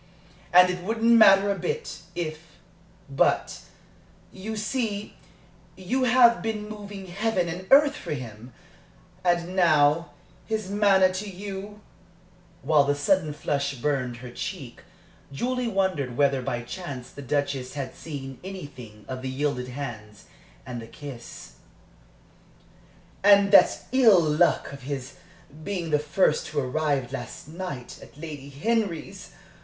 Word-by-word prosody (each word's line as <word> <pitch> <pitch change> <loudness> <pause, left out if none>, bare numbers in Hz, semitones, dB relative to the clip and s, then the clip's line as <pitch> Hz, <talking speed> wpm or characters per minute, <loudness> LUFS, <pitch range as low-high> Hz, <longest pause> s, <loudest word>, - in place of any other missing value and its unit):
And 180 0 +7
it 180 0 -5
wouldn't 225 +3 +1
matter 200 -3 +7
a 195 - -3
bit, 175 - -3 0.2
if 160 -2 -6 0.5
But, 135 -1 +1 0.7
you 215 +3 -6
see, 215 -2 -3 0.6
you 250 +8 -1
have 245 -2 +5
been 215 -2 -3
moving 205 -2 -8
heaven 190 0 -1
and 180 +3 -6
earth 285 +1 +6
for - - -5
him! 120 -2 -9 0.7
And 175 0 +1
now 155 -3 +3 0.3
his 215 -3 -3
manner 195 -2 +4
to 200 +2 -4
you" 200 +2 -7 0.8
(while 150 0 +4
the 145 0 +1
sudden 155 +2 +1
flush 140 -1 -2
burned 125 -2 -1
her 125 0 -9
cheek, 145 -4 -6 0.5
Julie 250 - -1
wondered 185 - -1
whether 140 -2 +3
by 120 -1 -3
chance 135 -3 -7
the 145 - -10
Duchess 140 -1 -2
had 135 -2 -4
seen 135 -4 -8
anything 130 - -9
of 130 0 -5
the 130 - -4
yielded 130 -1 -2
hands 115 -6 -7 0.4
and 120 -2 -6
the 115 - -10
kiss) 120 - -10 1.7
"and 200 0 +6
that 200 - +6
ill 235 -7 +6
luck 155 -1 +2
of 140 - -9
his 135 -1 -6 0.5
being 180 -4 -3
the 150 - +3
first 150 +1 +1
to 150 - -2
arrive, 135 -1 -1
last 135 - -7
night, 160 -6 -7
at - - -15
Lady 150 -3 -8
Henry's! 195 +2 -2
160 Hz, 130 wpm, -26 LUFS, 135-200 Hz, 1.7 s, And